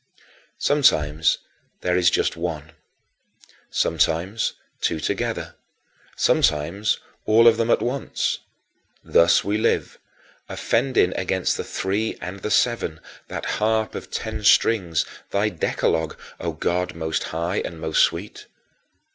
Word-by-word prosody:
Sometimes 80 Hz, -, +3 dB, 0.4 s
there 90 Hz, 0 st, +1 dB
is 90 Hz, -1 st, +4 dB
just -, -, 0 dB
one; 85 Hz, -2 st, -4 dB, 1.0 s
sometimes 85 Hz, +6 st, 0 dB, 0.3 s
two 80 Hz, -, 0 dB
together; -, -, -2 dB, 0.6 s
sometimes 85 Hz, +8 st, +2 dB, 0.3 s
all 115 Hz, +2 st, +6 dB
of 115 Hz, -1 st, +6 dB
them 115 Hz, 0 st, 0 dB
at -, -, +3 dB
once. 130 Hz, +3 st, -1 dB, 0.6 s
Thus 85 Hz, 0 st, +4 dB
we 105 Hz, +1 st, 0 dB
live, 115 Hz, -, 0 dB, 0.5 s
offending 120 Hz, -6 st, +1 dB
against 95 Hz, 0 st, 0 dB
the -, -, -3 dB
Three 100 Hz, +4 st, -2 dB
and 95 Hz, +2 st, -6 dB
the 105 Hz, -, -4 dB
Seven, 105 Hz, -8 st, +1 dB, 0.3 s
that -, -, -5 dB, 0.2 s
harp 110 Hz, 0 st, +1 dB
of -, -, -7 dB
ten -, -, -4 dB
strings, 90 Hz, -9 st, +3 dB, 0.2 s
thy 100 Hz, +2 st, +1 dB
Decalogue, 80 Hz, -3 st, -1 dB, 0.2 s
O -, -, -2 dB
God 90 Hz, 0 st, -1 dB
most 80 Hz, -1 st, -2 dB
high 85 Hz, +4 st, -2 dB
and 85 Hz, -2 st, -4 dB
most 80 Hz, 0 st, +1 dB
sweet. -, -, -1 dB
90 Hz, 120 wpm, -23 LUFS, 80-110 Hz, 1.0 s, all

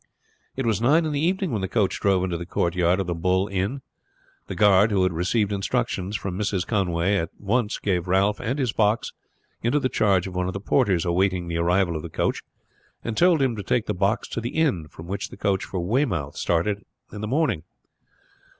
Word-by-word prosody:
It 135 Hz, -, -2 dB
was 110 Hz, -2 st, +1 dB
nine 155 Hz, +7 st, +4 dB
in 155 Hz, -, -1 dB
the 145 Hz, -, -1 dB
evening 185 Hz, +1 st, 0 dB
when 110 Hz, -4 st, -1 dB
the 95 Hz, -, -1 dB
coach 105 Hz, -1 st, 0 dB
drove 95 Hz, -2 st, +2 dB
into 90 Hz, -2 st, -1 dB
the 85 Hz, 0 st, -5 dB
courtyard 90 Hz, +1 st, +1 dB
of 95 Hz, -, -1 dB
the 85 Hz, -, -2 dB
Bull 90 Hz, +3 st, +1 dB
Inn. 100 Hz, +8 st, -2 dB, 0.6 s
The -, -, -5 dB
guard, 105 Hz, 0 st, +5 dB
who 100 Hz, -3 st, +2 dB
had 95 Hz, -2 st, +1 dB
received 100 Hz, +5 st, 0 dB
instructions 100 Hz, -1 st, -1 dB
from 95 Hz, -2 st, -3 dB
Mrs. 95 Hz, -2 st, -1 dB
Conway, 95 Hz, -2 st, +1 dB
at 80 Hz, -3 st, -2 dB
once 105 Hz, +2 st, 0 dB
gave 90 Hz, -3 st, -1 dB
Ralph 100 Hz, +3 st, +2 dB
and 130 Hz, +6 st, -2 dB
his 125 Hz, -6 st, 0 dB
box 105 Hz, +1 st, +1 dB, 0.5 s
into 120 Hz, +6 st, +2 dB
the 130 Hz, -, 0 dB
charge 95 Hz, -7 st, +2 dB
of 95 Hz, -, -6 dB
one 90 Hz, 0 st, -1 dB
of 95 Hz, -, -3 dB
the 95 Hz, -, -4 dB
porters 95 Hz, -3 st, +1 dB
awaiting 90 Hz, 0 st, +1 dB
the 85 Hz, -, -2 dB
arrival 90 Hz, 0 st, +2 dB
of 80 Hz, -, -3 dB
the -, -, -7 dB
coach, -, -, -1 dB, 0.6 s
and 115 Hz, -, -3 dB
told 170 Hz, -2 st, +4 dB
him 125 Hz, -3 st, +1 dB
to 105 Hz, -, -4 dB
take 110 Hz, +3 st, 0 dB
the -, -, -1 dB
box 100 Hz, +4 st, 0 dB
to 115 Hz, -, -3 dB
the 120 Hz, +2 st, -5 dB
inn 135 Hz, -, +1 dB
from 80 Hz, -, -12 dB
which 95 Hz, +3 st, -4 dB
the -, -, -11 dB
coach 95 Hz, -2 st, 0 dB
for 95 Hz, -, -4 dB
Weymouth 90 Hz, -, 0 dB
started 100 Hz, +5 st, 0 dB, 0.3 s
in 105 Hz, -, -6 dB
the 110 Hz, -, -3 dB
morning. 140 Hz, -, +1 dB
100 Hz, 215 wpm, -24 LUFS, 90-115 Hz, 0.6 s, guard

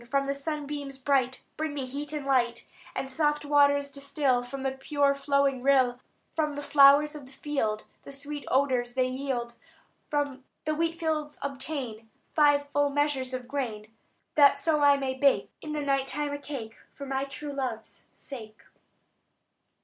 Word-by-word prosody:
From 275 Hz, +1 st, +1 dB
the 275 Hz, -, 0 dB
sunbeams 285 Hz, -1 st, -4 dB
bright 265 Hz, -1 st, +1 dB
Bring 310 Hz, -1 st, -2 dB
me 275 Hz, -2 st, -2 dB
heat 285 Hz, +3 st, -5 dB
and 300 Hz, -2 st, -4 dB
light; 245 Hz, -3 st, +1 dB, 0.3 s
And 270 Hz, -, -2 dB
soft 295 Hz, +1 st, 0 dB
waters 285 Hz, -1 st, +4 dB
distil 275 Hz, -2 st, 0 dB
From 265 Hz, +2 st, -6 dB
the 270 Hz, -, +1 dB
pure 280 Hz, +1 st, +1 dB
flowing 280 Hz, -2 st, +1 dB
rill. 260 Hz, -2 st, +3 dB, 0.3 s
From 300 Hz, -2 st, -1 dB
the 290 Hz, -, -5 dB
flowers 285 Hz, +1 st, +6 dB
of 290 Hz, -3 st, -9 dB
the -, -, -16 dB
field 265 Hz, -7 st, -2 dB, 0.2 s
The -, -, -11 dB
sweet 285 Hz, +1 st, -6 dB
odours 255 Hz, -3 st, +1 dB
they 255 Hz, -1 st, +2 dB
yield. 255 Hz, -3 st, -3 dB, 0.5 s
From 285 Hz, -3 st, -1 dB, 0.2 s
the 310 Hz, -, +1 dB
wheatfields 320 Hz, -2 st, -1 dB
obtain 260 Hz, -5 st, -5 dB, 0.2 s
Five 290 Hz, -2 st, +4 dB
full 290 Hz, 0 st, +2 dB
measures 280 Hz, -2 st, 0 dB
of 255 Hz, -1 st, -5 dB
grain, 225 Hz, -6 st, -4 dB, 0.4 s
That 285 Hz, -2 st, +6 dB
so 310 Hz, -2 st, +1 dB
I 285 Hz, -1 st, +6 dB
may 270 Hz, -1 st, -1 dB
bake 275 Hz, +1 st, +2 dB
In 305 Hz, -1 st, -5 dB
the 300 Hz, -, -1 dB
night 275 Hz, -1 st, +1 dB
time 295 Hz, +1 st, -2 dB
a 285 Hz, -, -4 dB
cake, 260 Hz, -6 st, -7 dB, 0.2 s
For 280 Hz, -, -7 dB
my 270 Hz, 0 st, -1 dB
true 285 Hz, +1 st, -7 dB
love's 250 Hz, -5 st, -5 dB
sake." 220 Hz, -6 st, -10 dB
280 Hz, 165 wpm, -28 LUFS, 260-290 Hz, 0.5 s, flowers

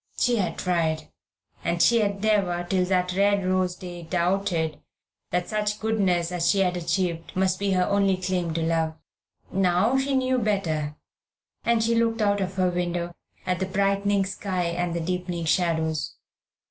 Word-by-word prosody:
She 245 Hz, -1 st, +2 dB
had 190 Hz, -4 st, -1 dB
tried, 160 Hz, -3 st, 0 dB, 0.5 s
and 170 Hz, -, 0 dB
she 235 Hz, +6 st, +5 dB
had 200 Hz, -1 st, -1 dB
never 190 Hz, -5 st, +1 dB
till 185 Hz, 0 st, +1 dB
that 180 Hz, -1 st, +1 dB
red 200 Hz, 0 st, +2 dB
rose 185 Hz, -1 st, +1 dB
day 175 Hz, -1 st, -8 dB
doubted 170 Hz, -2 st, 0 dB, 0.5 s
that 180 Hz, 0 st, -1 dB
such 210 Hz, -1 st, -1 dB
goodness 190 Hz, -6 st, +1 dB
as 175 Hz, -1 st, +1 dB
she 195 Hz, -, +3 dB
had 180 Hz, -1 st, +1 dB
achieved 170 Hz, -1 st, -1 dB
must 185 Hz, 0 st, +1 dB
be 200 Hz, -1 st, +1 dB
her 185 Hz, -1 st, +3 dB
only 200 Hz, -2 st, +2 dB
claim 180 Hz, -2 st, -1 dB
to 165 Hz, -, 0 dB
love. 160 Hz, -1 st, 0 dB, 0.6 s
Now 195 Hz, +7 st, +2 dB
she 270 Hz, 0 st, 0 dB
knew 260 Hz, -1 st, +2 dB
better, 165 Hz, -9 st, -1 dB, 0.7 s
and 235 Hz, -1 st, +2 dB
she 230 Hz, +1 st, +2 dB
looked 230 Hz, 0 st, +1 dB
out 205 Hz, -1 st, +2 dB
of 190 Hz, 0 st, -3 dB
her 185 Hz, -1 st, +2 dB
window 175 Hz, -1 st, -2 dB, 0.3 s
at 180 Hz, -1 st, 0 dB
the 190 Hz, -, -1 dB
brightening 200 Hz, 0 st, +1 dB
sky 190 Hz, -2 st, -2 dB
and 170 Hz, 0 st, -1 dB
the 170 Hz, -, -1 dB
deepening 180 Hz, 0 st, -3 dB
shadows. 160 Hz, -1 st, 0 dB
185 Hz, 165 wpm, -25 LUFS, 175-200 Hz, 0.7 s, she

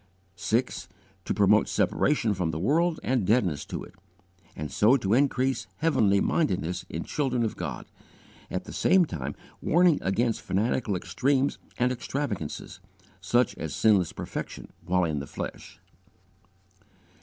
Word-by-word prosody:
6. 115 Hz, +7 st, -1 dB, 0.4 s
To -, -, 0 dB
promote -, -, +4 dB
separation 120 Hz, -7 st, +1 dB
from 90 Hz, -4 st, -1 dB
the 80 Hz, -, -3 dB
world 160 Hz, -, +1 dB
and 125 Hz, -4 st, +1 dB
deadness 95 Hz, -, +1 dB
to -, -, -5 dB
it, -, -, -13 dB, 0.6 s
and 75 Hz, -, -5 dB
so 115 Hz, +6 st, +4 dB
to 100 Hz, -4 st, 0 dB
increase 135 Hz, 0 st, +1 dB
heavenly 110 Hz, -11 st, +3 dB
mindedness 90 Hz, -, 0 dB
in -, -, -4 dB
children 130 Hz, -5 st, -1 dB
of 110 Hz, -, -2 dB
God; 75 Hz, -9 st, -5 dB, 0.6 s
at -, -, -3 dB
the -, -, -10 dB
same 185 Hz, -2 st, +4 dB
time 70 Hz, -, -5 dB, 0.3 s
warning 175 Hz, -1 st, +4 dB
against 115 Hz, +4 st, 0 dB
fanatical 105 Hz, +1 st, 0 dB
extremes 130 Hz, +11 st, 0 dB, 0.2 s
and 125 Hz, +1 st, +2 dB
extravagances, 105 Hz, -, -4 dB, 0.4 s
such 120 Hz, +6 st, +2 dB
as 75 Hz, -5 st, -4 dB
sinless 100 Hz, -6 st, +3 dB
perfection -, -, -6 dB
while 90 Hz, 0 st, +1 dB
in 80 Hz, -3 st, -1 dB
the 70 Hz, -, -6 dB
flesh. -, -, -7 dB
110 Hz, 135 wpm, -27 LUFS, 90-130 Hz, 0.6 s, promote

